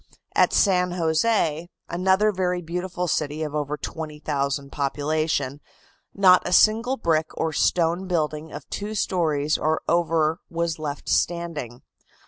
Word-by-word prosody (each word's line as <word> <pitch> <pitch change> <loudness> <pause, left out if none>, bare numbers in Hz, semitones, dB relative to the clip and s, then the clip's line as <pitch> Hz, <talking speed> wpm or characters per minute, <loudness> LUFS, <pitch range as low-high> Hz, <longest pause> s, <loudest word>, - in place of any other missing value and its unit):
At - - +4
San 180 -3 +3
Jose, 165 -1 +1 0.2
another 190 +4 +2
very 180 -2 -1
beautiful 180 +2 -3
city 155 -1 -1
of 150 -1 -4
over 150 0 -2
20,000 145 -3 -3
population, 145 0 -1 0.5
not 185 -2 +5
a - - -4
single 225 +7 +4
brick 160 -5 +1
or 160 -1 -1
stone 175 +4 +1
building 155 -3 -2
of - - -9
two 210 +1 -4
stories 155 -7 0
or 155 +1 0
over 165 -1 +1
was 170 -1 -2
left 145 -2 -5
standing. 165 -8 -1
165 Hz, 125 wpm, -24 LUFS, 150-180 Hz, 0.5 s, not